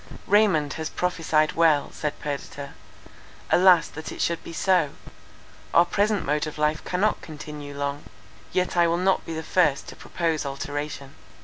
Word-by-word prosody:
"Raymond 190 -8 +3
has 160 - -3
prophesied 160 -3 +1
well," 160 -3 +3
said 150 -1 -4
Perdita, 140 -1 -5 0.8
"alas, 180 -2 +6
that 160 +1 -8
it - - -9
should 170 -1 -1
be - - -8
so! 165 -3 +2 0.8
our 170 - +7
present 205 +2 0
mode 150 +2 0
of 155 - -7
life 150 +1 0
cannot 195 +4 0
continue 150 -2 -8
long, 140 0 -3 0.5
yet 185 0 0
I 170 -1 +4
will 170 +1 +1
not 190 +2 +2
be 165 - -4
the 160 - -4
first 155 -7 +1
to - - -10
propose 165 -3 -2
alteration. 140 0 -5
160 Hz, 155 wpm, -25 LUFS, 145-180 Hz, 0.8 s, our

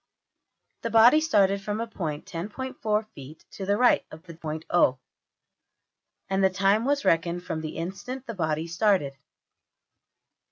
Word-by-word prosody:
The 230 - -2
body 230 +7 +6
started 200 -9 +2
from 205 +2 -3
a 230 - -1
point 160 -9 -5
$10.4$~feet 210 - -5
to 190 - -7
the 200 +1 +2
right 250 +1 +4
of 155 +1 -12
the 170 -2 -11
point~$O$; 155 -3 0 1.3
and 195 0 0
the 190 - +5
time 195 +4 +2
was 285 +1 0
reckoned 170 +1 +1
from 160 -3 -4
the 155 -1 -6
instant 200 +10 -6
the 230 - -5
body 160 -4 -1
started. 170 -4 +1
195 Hz, 135 wpm, -26 LUFS, 165-220 Hz, 1.3 s, body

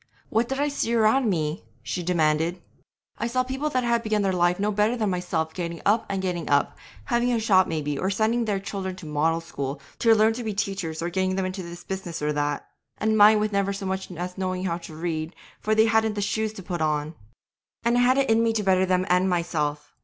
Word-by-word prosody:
'What 230 +2 +1
did 270 +1 -2
I 290 - +2
see 260 -5 -1
around 225 +2 +3
me?' 155 -3 -1 0.2
she 120 +10 -3
demanded. 165 0 +1 0.6
'I 235 - 0
saw 255 +2 +1
people 265 +4 -2
that 255 -3 0
had 235 -1 +2
begun 215 -2 0
life 180 -2 +2
no 210 +1 +1
better 210 +4 +1
than 215 -4 0
myself 170 -3 -2
getting 170 -2 -4
up 220 +2 +2
and 195 -1 -2
getting 180 -3 -2
up, 145 0 +2 0.3
having 240 +1 +1
a 235 - +1
shop 190 -4 +4
maybe, 150 -3 -2
or 190 - 0
sending 225 +4 +1
their 205 -3 0
children 195 -1 -4
to 185 - -11
the 150 - -7
"Model" 160 +2 +1
School 140 -4 -5 0.2
to 225 -1 +5
learn 220 +1 +4
to 240 +2 -5
be 215 -3 -3
teachers, 190 -6 -3
or 175 - -2
getting 185 +1 0
them 190 -1 0
into 185 +1 -4
this 175 0 -9
business 190 -4 -5
or 150 0 -1
that, 145 0 -2 0.3
and 220 +1 +1
mine 210 0 +7
with 210 0 0
never 200 0 0
so 195 0 -5
much 190 0 -3
as 180 +2 -6
knowing 185 -1 -2
how 170 -2 -1
to 160 -2 -10
read, 160 0 -3 0.2
for 215 0 0
they 220 0 +5
hadn't 220 -1 +2
the 205 - -2
shoes 220 +1 -1
to 195 - -9
put 175 -2 -4
on 150 0 0 0.7
'And 235 +1 +2
I 245 - +4
had 255 +2 +4
it 275 -1 +2
in 225 0 +4
me 230 -1 +2
to 215 -1 -1
better 190 -1 +3
them 185 0 +2
and 180 +1 +3
myself. 150 -4 -2
190 Hz, 235 wpm, -25 LUFS, 170-220 Hz, 0.7 s, mine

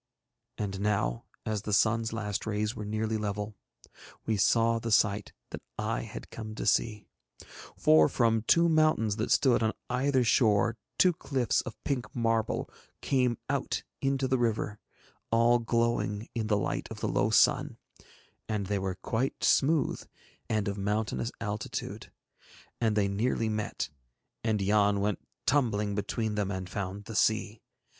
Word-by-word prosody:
And 95 -2 -3
now 100 -13 0 0.2
as 110 -2 -1
the 105 - -5
sun's 110 +2 +2
last 110 -2 -3
rays 105 +1 -1
were 105 - -5
nearly 110 +1 -1
level, 105 0 -3 0.7
we 110 - +1
saw 115 +3 +3
the 115 - -4
sight 105 -1 +2 0.2
that - - -6 0.2
I - - -1
had - - -9
come 110 -1 -7
to - - -4
see; 105 -2 +1 0.7
for 80 0 +5
from 115 -2 +2
two 170 0 +5
mountains 155 -10 +3
that 110 - -1
stood 130 -4 +4
on 110 0 +1 0.2
either 130 +1 +2
shore 115 -1 +3 0.2
two 180 -1 +5
cliffs 135 -6 0
of 125 - -8
pink 135 -4 -3
marble 115 -2 0 0.4
came 125 -4 +2
out - - -1 0.2
into 135 -1 +1
the 130 -1 +1
river, 110 -3 -1 0.5
all 115 +1 +4
glowing 115 -2 0
in 115 -2 -2
the 105 -1 +2
light 95 - -2
of - - -8
the - - 0
low - - +1
sun, - - +3 0.7
and 105 -2 -1
they 100 +1 -1
were 95 -1 -2
quite 125 +4 -1
smooth 150 +2 +2 0.5
and 110 -2 0
of 100 0 -3
mountainous 105 +3 -1
altitude, 105 0 -5 0.7
and 110 -2 +2
they 100 -2 +2
nearly 110 +3 0
met, 110 -1 -3 0.5
and 110 -3 +1
Yann 100 0 +3
went 105 0 0 0.3
tumbling 105 -7 +1
between 110 +2 -2
them 105 -2 -1
and 95 -2 -4
found 100 +1 -5
the 110 - -7
sea. 110 +2 +1
110 Hz, 150 wpm, -29 LUFS, 105-115 Hz, 0.7 s, for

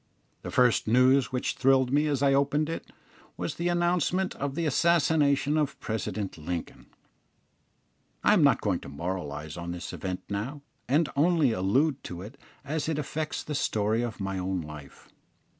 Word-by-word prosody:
The - - -6
first 125 -4 +3
news 125 +3 +4
which 125 -1 -1
thrilled 130 -1 +3
me 150 +2 +3
as 140 -2 0
I 135 -1 +4
opened 145 +3 +2
it 165 - -6 0.5
was - - -3
the 170 - -2
announcement 175 +1 +1
of 140 0 -3
the 170 - -1
assassination 150 -2 +3
of 150 -2 -1
President 105 -4 -4
Lincoln. 85 +2 -5 1.4
I - - +5
am - - +4
not - - +4
going - - 0
to - - -10
moralise 75 -1 -5
on 85 0 -4
this 85 - -7
event 95 -1 -4
now, 120 +9 -4 0.3
and 150 +4 +3
only 155 -2 +3
allude 130 +9 +1
to 90 0 -6
it 115 +7 -11 0.3
as 155 +1 -2
it 160 - -1
affects 155 +1 -3
the 150 - -5
story 110 -4 0
of 120 -2 -4
my 95 -1 -3
own 90 0 -2
life. 75 -2 -11
130 Hz, 165 wpm, -28 LUFS, 95-150 Hz, 1.4 s, I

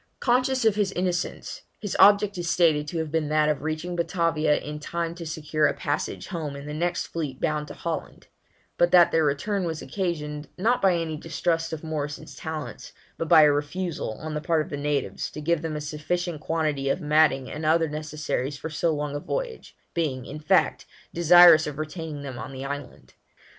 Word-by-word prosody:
Conscious 255 0 +2
of 220 - +5
his 205 -2 0
innocence, 180 0 -2 0.2
his 205 -3 -4
object 205 0 +6
is 175 -2 -3
stated 155 -4 +3
to 170 - -4
have 160 -2 -2
been 160 -2 0
that 155 0 +3
of 150 - 0
reaching 160 +3 -3
Batavia 165 -3 +1
in 150 +1 -6
time 165 +2 -3
to 170 -1 -8
secure 155 -1 0
a - - -1
passage 145 0 -3
home 155 -6 -4
in 140 0 -8
the 150 - -6
next 170 +3 -1
fleet 150 -6 -5
bound 150 -1 -1
to - - -9
Holland; 170 -1 -5 0.5
but 175 - +5
that 175 -1 +6
their 160 - +3
return 185 +8 0
was 165 -2 -3
occasioned, 150 -2 -3
not 230 +7 +2
by 190 -2 +4
any 165 -2 -2
distrust 165 +1 -1
of 160 -1 -5
Morrison's 155 -1 -5
talents, 160 -1 -6 0.3
but 165 - -2
by 155 - +8
a 150 - +6
refusal, 150 -1 -2
on 155 +7 -7
the 150 - -2
part 160 0 +1
of - - -12
the - - -2
natives, 145 -8 -2
to - - -8
give 160 +1 0
them 160 -2 -3
a 150 - -3
sufficient 155 +2 -3
quantity 155 -4 -1
of 155 - +1
matting 150 -4 +3
and 150 - -6
other 165 +1 +3
necessaries 150 -2 -3
for 160 - -6
so 165 +2 +1
long 150 -1 -3
a - - -2
voyage, - - -5 0.2
being, 140 -7 -1
in 150 - -7
fact, 150 - +2 0.3
desirous 170 -1 +7
of 145 -2 -5
retaining 155 -1 -5
them 130 -4 -6
on 110 +3 -6
the 135 0 -6
island. 145 -1 -7
155 Hz, 200 wpm, -25 LUFS, 150-170 Hz, 0.5 s, by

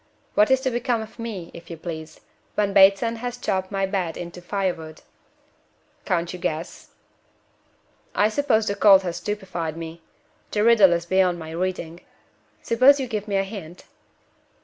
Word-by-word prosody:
"What 210 - +4
is 265 0 +3
to 260 -1 -1
become 240 -1 -1
of 220 +2 -14
me, 210 -7 -6
if 170 0 -12
you 170 - -7
please, 160 -1 -8 0.3
when 205 -1 +1
Bateson 195 +4 +5
has 245 +1 -5
chopped 190 -5 -2
my 195 -1 0
bed 190 -4 -2
into 175 0 -8
fire 190 0 -1
wood?" 160 -1 -11 1.0
"Can't 175 -2 -1
you 180 - -7
guess?" 160 0 -4 1.3
"I 205 - +4
suppose 225 -3 +1
the 200 - 0
cold 195 -2 +6
has 175 -2 -3
stupefied 175 -4 -4
me. 165 0 -8 0.5
The 210 - 0
riddle 220 -5 +6
is 170 0 -2
beyond 185 0 +2
my 160 -1 -8
reading. 175 -1 -3 0.6
Suppose 255 +5 +5
you 265 - -1
give 215 -3 -4
me 200 - -2
a 195 - +2
hint?" 190 -4 -9
195 Hz, 165 wpm, -23 LUFS, 170-220 Hz, 1.3 s, cold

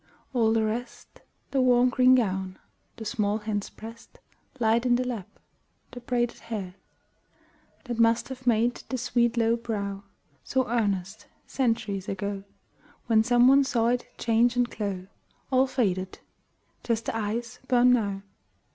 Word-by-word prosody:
All 230 -3 +3
the 225 -1 +2
rest 235 +3 -6 0.3
The 270 - +2
warm 250 0 +4
green 255 0 +5
gown, 190 -5 -1 0.4
the 220 - -8
small 210 -1 0
hands 210 -2 -3
pressed 230 +1 -12 0.4
Light 230 0 +2
in 245 -1 +3
the 250 +1 0
lap, 230 -7 -4 0.6
the 245 - -8
braided 240 -1 -1
hair 210 -6 -6 1.1
That 240 -3 -5
must 230 +2 +3
have 255 -1 -9
made 235 +1 +2
the 260 - -2
sweet 240 -1 +1
low 230 0 +3
brow 205 -4 -4 0.4
So 260 -1 0
earnest, 205 -3 -1 0.2
centuries 225 -7 -1
ago, 195 0 -3 0.6
When 220 -1 +4
some 245 +1 +4
one 275 +1 +6
saw 235 -3 +1
it 245 0 -1
change 235 +1 +2
and 245 0 +2
glow 200 -5 -4 0.5
All 260 +1 +4
faded! 190 -8 -1 0.7
Just 230 -1 -1
the - - -3
eyes 225 +2 -3
burn 250 -1 +5
now. 200 -5 -1
230 Hz, 145 wpm, -27 LUFS, 210-245 Hz, 1.1 s, one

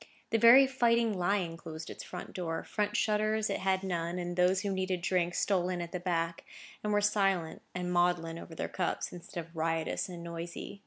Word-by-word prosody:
The 225 - +3
very 240 +5 +9
Fighting 235 -4 +2
Lion 180 -2 0
closed 160 -1 -8
its - - -8
front - - -8
door, 165 -3 -3
front 210 0 -1
shutters 215 0 +1
it - - -1
had 190 0 +1
none, 175 -2 -2
and 175 0 -3
those 180 +1 +3
who 200 -1 -1
needed 185 -2 -1
drink 180 -2 +1
stole 185 -3 +1
in 180 -1 -2
at 170 -1 -5
the 180 - -3
back, 170 -2 -1 0.4
and 210 - 0
were 205 0 +3
silent 195 -5 +1
and 180 0 -2
maudlin 175 -2 +1
over 165 - -10
their - - -2
cups, 180 - -2
instead 175 0 -7
of 165 +1 -21
riotous 165 +2 -1
and 175 -2 -7
noisy. 170 +3 -6
180 Hz, 200 wpm, -31 LUFS, 170-205 Hz, 0.4 s, very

